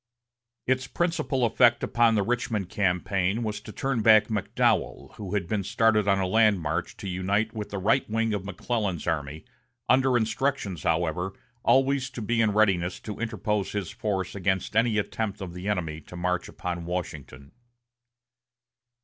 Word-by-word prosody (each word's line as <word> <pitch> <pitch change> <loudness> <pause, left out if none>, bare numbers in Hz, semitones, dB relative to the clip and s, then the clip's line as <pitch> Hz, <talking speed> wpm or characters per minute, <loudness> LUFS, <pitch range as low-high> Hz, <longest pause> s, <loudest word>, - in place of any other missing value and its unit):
Its 130 0 0
principal 155 -5 0
effect 120 +1 +4
upon 115 -1 +3
the 105 - +2
Richmond 110 -4 -1
campaign 95 +2 0
was 105 -1 -3
to - - -10
turn 135 0 -1
back 110 0 +6
McDowell, 105 -3 0
who 105 -1 -4
had 95 -5 -1
been 105 0 -1
started 110 +1 +2
on 100 -1 +4
a 95 - +1
land 105 +1 +4
march 80 +2 -3
to 100 - -7
unite 100 +4 0
with 105 -2 -5
the 100 - -4
right 110 +7 +1
wing 115 0 0
of 100 -3 -2
McClellan's 100 -3 -2
army, 75 -1 -3 0.4
under 130 -1 +4
instructions, 110 - -1
however, 85 +3 0 0.3
always 135 0 +3
to 125 -2 -7
be 115 +2 +1
in 110 -2 +3
readiness 95 -4 +2
to 105 - -7
interpose 105 -3 -2
his 100 -4 -3
force 95 -4 -2
against 95 0 -1
any 115 -1 +3
attempt 105 0 -2
of 95 -4 -6
the 90 +3 -5
enemy 80 -6 -2
to 90 - -12
march 90 +1 -1
upon 85 -1 -5
Washington. 75 -6 -6
105 Hz, 160 wpm, -26 LUFS, 90-115 Hz, 0.4 s, back